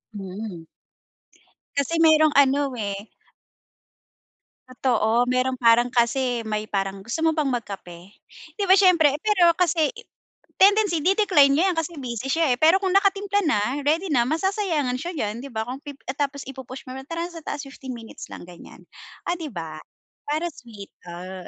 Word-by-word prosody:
Mm. 190 -3 -7 1.1
Kasi 305 +4 0
merong 310 -1 +5
ano, 280 -1 +3
eh 205 -1 -5 1.6
Totoo, 240 -2 +1
meron 255 +1 0
parang 240 +1 +4
kasi 245 0 +1
may 215 0 -3
parang, 195 -1 -2
gusto 235 +10 -4
mo 320 - +3
bang 300 -3 0
mag-kape? 195 -5 -6 0.4
'Di 405 - -2
ba 380 - +9
siyempre. 340 -7 +5
Pero 375 -6 +4
kasi, 335 -3 +2 0.7
tendency 400 -5 +4
di-decline 360 -7 +4
niya 335 - +3
'yan - - -11
kasi 325 +1 -3
busy 250 -1 -5
siya, 320 -2 +2
eh, 245 - -3
pero 325 +4 +6
kung 380 -1 -1
nakatimpla 400 0 +2
na, 210 -9 +2 0.2
ready 325 +6 +1
na, 240 -2 +4
masasayangan 330 -7 0
siya 345 - -4
diyan, 215 0 -3
'di 275 - -8
ba? 220 0 -2
Kung 260 +3 -7
pi 285 -2 -9
ah, 265 - -3
tapos 280 -1 -2
i-pu-push 265 +2 -9
mo, 255 - -7 0.2
tara 335 +1 -3
sa 330 -1 -9
taas 290 -1 -5
15 270 -2 -8
minutes 225 -1 -11
lang - - -9
ganyan, 175 -1 -14 0.4
ah, 350 - 0
'di 325 -4 -6
ba? 165 -6 -7 0.5
Para 310 +3 0
sweet, 220 -7 -12 0.2
ah. 185 +1 -8
270 Hz, 160 wpm, -23 LUFS, 230-330 Hz, 1.6 s, ba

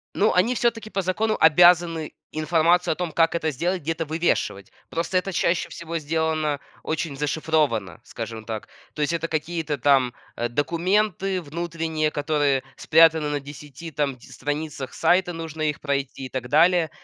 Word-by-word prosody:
Ну 215 - +3
они, 195 +7 +3
всё-таки, 230 -2 0
по 195 - -1
закону, 215 +4 0
обязаны 165 0 +5 0.2
информацию 165 +3 +2
о - - -11
том, 175 -1 -3
как 165 +1 +2
это 160 -2 0
сделать, 175 +6 -1
где-то 165 +2 -2
вывешивать. 155 - -1 0.2
Просто 170 +3 -1
это 190 +2 -1
чаще 170 0 +1
всего 170 0 -5
сделано 155 -1 -1 0.2
очень 155 -2 -3
зашифровано, 145 - 0
скажем 115 -2 -7
так. 110 -2 -5 0.3
То 150 - -5
есть 150 +3 +1
это 165 0 -1
какие-то 160 -1 -2
там, 130 -2 +3 0.2
э, 120 0 -1
документы 185 - 0
внутренние, 160 0 -2
которые 145 -3 +1
спрятаны 160 -1 +4
на 145 0 -1
10 145 +3 -10
там 145 -1 0
этих 120 - -17
страницах 145 -1 -4
сайта, 175 +2 +2
нужно 160 -1 -6
их 150 -1 -1
пройти, 140 -2 -3
и - - -7
так 125 -1 -4
далее. 165 +3 +4
160 Hz, 160 wpm, -24 LUFS, 145-170 Hz, 0.3 s, обязаны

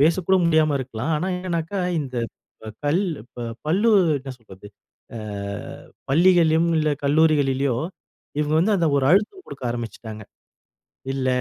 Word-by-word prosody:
பேசக்கூட 170 +5 +3
முடியாம 155 -3 +3
இருக்கலாம். 130 +4 -3
ஆனா 165 - -2
என்னன்னாக்கா, 180 +1 -3 0.2
இந்த 130 -4 -6 0.7
கல் 165 +7 +2 0.2
இப்போ 120 0 -10 0.2
பள்ளி 195 +8 +2 0.3
என்ன 135 0 -8
சொல்றது 105 -3 -14 0.5
அ - - -5 0.9
பள்ளிகள்லயும் 170 0 +4
இல்ல 155 -1 +1
கல்லூரிகளிலயோ, 140 -4 +2 0.6
இவுங்க 150 +1 +1
வந்து 205 +4 +3
அந்த 170 -3 +2
ஒரு 135 - +2
அழுத்தம் 215 - +2
குடுக்க 135 - -9
ஆரம்பிச்சுட்டாங்க. 110 -2 -6 0.9
“இல்ல, 130 -1 -1
155 Hz, 120 wpm, -23 LUFS, 130-170 Hz, 0.9 s, பள்ளிகள்லயும்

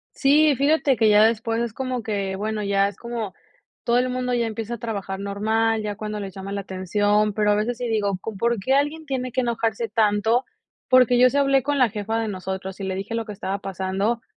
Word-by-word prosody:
Sí, 295 +1 +4
fíjate 280 -1 +2
que 220 - +4
ya 210 0 +6
después 225 +1 +1
es 235 - -2
como 255 -2 -3
que, 200 -3 -2
bueno, 215 +1 -3
ya 200 0 +2
es 205 - -7
como 235 -5 -5 0.5
todo 235 +1 +2
el 255 - 0
mundo 250 0 -2
ya 235 -1 +1
empieza 225 +1 -4
a - - -9
trabajar 200 -4 -4
normal, 220 +3 0
ya 210 -1 -4
cuando 210 0 -5
les 195 -2 -6
llama 195 +1 -7
la 200 0 -2
atención, 205 +3 0
pero 210 0 +2
a - - +3
veces 225 +3 -1
sí 245 -1 -3
digo, 205 -4 0
con 215 0 -6
¿por 235 +1 +1
qué 260 +7 0
alguien 295 +3 0
tiene 255 -3 -3
que 255 +2 0
enojarse 230 -1 -1
tanto? 220 +3 +2 0.4
Porque 250 -1 +5
yo 255 +1 +7
sí 280 - -1
hablé 275 -2 +3
con 290 0 0
la 250 -3 +4
jefa 215 +2 -2
de 225 - -2
nosotros 190 -1 -5
y - - -5
le 190 -1 -2
dije 195 +4 -4
lo 230 -1 -2
que 215 - -7
estaba 195 0 -4
pasando, 195 +4 -2
220 Hz, 230 wpm, -23 LUFS, 200-245 Hz, 0.5 s, yo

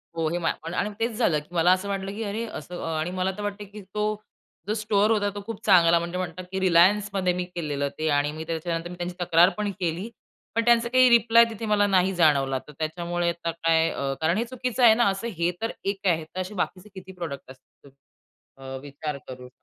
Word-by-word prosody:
हो, 165 -1 0
हे 175 - -1
माल 165 - 0
पण 165 +1 -6
आणि 205 - -1
मग 210 - -11
तेच 230 +1 0
झालं 175 -11 +2
की 150 +4 -17
मला 175 +1 +4
असं 185 +2 -2
वाटलं 195 0 -3
की 225 - -4
"अरे 215 +2 -3
असं" 180 -5 -8 0.2
आणि 170 +3 -2
मला 185 +1 -1
तर - - -5
वाटत 205 0 -4
की 210 - -8
तो 200 +2 -4 0.6
जो 210 - 0
स्टोअर 215 0 +1
होता, 205 -2 +2
तो 205 - -5
खूप 225 -1 -7
चांगला 170 -4 +6
म्हणजे 170 +1 -4
म्हणतात 185 0 -4
की 190 - -2
Relianceमध्ये 190 +1 +3
मी 180 0 -2
केलेलं 145 -4 -2
ते 155 - 0
आणि 145 0 +1
मी 155 +1 -6
त्याच्यानंतर 165 +1 -3
मी 180 - -8
त्यांची 175 0 -5
तक्रार 175 +1 +5
पण 210 -1 -1
केली. 180 +4 -2 0.5
पण 230 0 +1
त्यांचा 235 0 +4
काही 255 0 +5
रिप्लाय 235 -1 +6
तिथे 225 0 -6
मला 205 -1 +3
नाही 190 -1 +2
जाणवला. 140 -5 +3
तर - - -10
त्याच्यामुळे 170 +2 -1
आता 170 -1 -3
काय 165 0 +2
अ, 135 -3 -2
कारण 165 +5 +2
हे 230 - +1
चुकीचं 250 0 -2
आहे 230 -2 +9
ना 240 0 +3
असं 195 +4 -3
हे 170 +1 +1
तर 225 - -1
एक 195 0 -2
आहे. 165 -3 +1
तसे 185 +2 -4
बाकीचे 185 +1 -4
किती 190 0 -10
प्रॉडक्ट 165 -8 -7
असतील 130 +1 -19 0.7
अ, 135 0 -8
विचार 145 +1 -6
करू. 125 -1 -9
180 Hz, 225 wpm, -25 LUFS, 165-210 Hz, 0.7 s, आहे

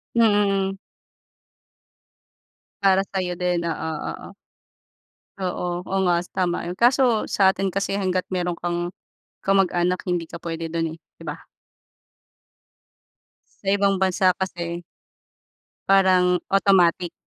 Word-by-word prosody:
Mm, 205 -4 +3
hmm. 195 - -10 2.0
Para 195 0 +4
sa'yo 180 -2 -2
din. 180 0 0
Oo, 160 0 -3 0.2
oo. - - -9 1.1
Oo. 180 -1 -3
Oo 195 - -2
nga, 175 -1 +3 0.2
tama 175 -2 -1
'yon. 175 - -4
Kaso 240 -2 +3
sa 190 -1 +4
atin 195 0 -1
kasi 195 +1 -2
hangga't 185 -2 0
meron 175 -1 -1
kang 175 0 -2 0.5
kamag-anak, 180 -2 +2
hindi 175 -2 -2
ka 170 - -7
puwede 165 -1 -5
do'n, 165 -1 -2
eh, - - -11 0.2
'di - - -13
ba? - - -6 2.2
Sa 195 - -11
ibang 195 -1 +2
bansa 185 0 +3
kasi 175 -2 -4 1.0
parang 185 -2 +4
automatic 185 -3 +3
185 Hz, 115 wpm, -23 LUFS, 175-195 Hz, 2.2 s, Para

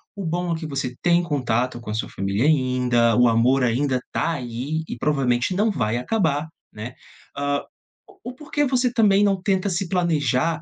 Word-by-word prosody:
O 200 -2 -5
bom 175 +1 -1
é - - -4
que 160 - -6
você 135 -3 -3
tem 175 0 +4
contato 125 -5 -1
com 110 - -9
a 105 - -2
sua 110 - -3
família 100 +5 -1
ainda, 125 -5 +2
o 125 - +5
amor 120 +4 +3
ainda 125 +2 +1
tá 165 - 0
aí, 130 +3 -4
e, - - -6
provavelmente, 130 +1 +1
não 210 +3 +2
vai 120 - -1
acabar, 150 - 0 0.3
né, 115 +4 -7 0.4
hã, 145 0 0 0.5
o - - -11
o - - -13
por 300 +2 -14
que 295 0 +2
você, 255 -2 +1
também, 205 -3 +4
não 195 -2 +1
tenta 190 0 0
se 185 0 -2
planejar, 165 -3 +1
145 Hz, 190 wpm, -23 LUFS, 125-180 Hz, 0.5 s, o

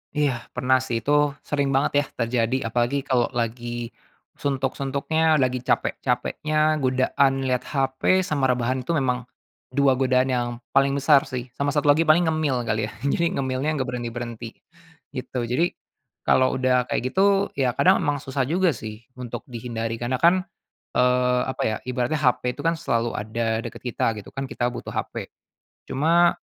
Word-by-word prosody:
Iya, 145 -3 +2 0.2
pernah 130 +1 +3
sih 115 -3 -3
itu, 145 - 0 0.3
sering 140 -1 0
banget 135 - +2
ya 145 - 0
terjadi 115 +1 +1 0.2
apalagi 125 +4 0
kalau 125 -4 +2
lagi 120 0 -3 0.5
suntuk-suntuknya, 140 +3 0
lagi 130 -3 +1
capek-capeknya, 155 +4 0
godaan 135 +1 +2
lihat 125 -1 0
HP 135 +7 +1
sama 140 -5 0
rebahan 125 +1 0
itu 170 - 0
memang, 125 -3 0 0.4
2 135 0 +2
godaan 130 0 +2
yang 120 -1 0 0.2
paling 135 0 +3
besar 140 0 +4
sih. 125 -1 -5
Sama 140 +3 -2
satu 145 0 +4
lagi 160 +3 +2
paling 155 +3 +5
ngemil 155 -6 0
kali 110 -1 -1
ya, - - -9
jadi, 170 +4 +1
ngemilnya 135 +3 -1
enggak 135 - 0
berhenti-berhenti, 120 -1 -5 0.6
gitu. 125 -2 -4
Jadi 125 +9 0 0.5
kalau 130 0 +4
udah 125 -1 +2
kayak 125 - 0
gitu 200 +1 +3
ya 130 -3 +1
kadang 185 +1 +4
emang 145 -2 0
susah 135 0 -1
juga 180 +3 +2
sih, 110 -3 -8 0.2
untuk 120 -2 -6
dihindari. 115 -1 -4
Karena 120 +2 -1
kan, 180 +2 +4 0.5
eee, 125 0 +3
apa - - -6
ya, 110 - 0
ibaratnya 125 +4 -1
HP 125 -2 +1
itu - - -7
kan 165 0 +2
selalu 115 0 0
ada 110 +1 -1
dekat - - -8
kita 115 -2 0
gitu - - -12
kan 135 0 -4
kita 120 - -1
butuh - - -7
HP. - - -4 0.6
Cuma 165 +5 +3
130 Hz, 160 wpm, -24 LUFS, 120-145 Hz, 0.6 s, paling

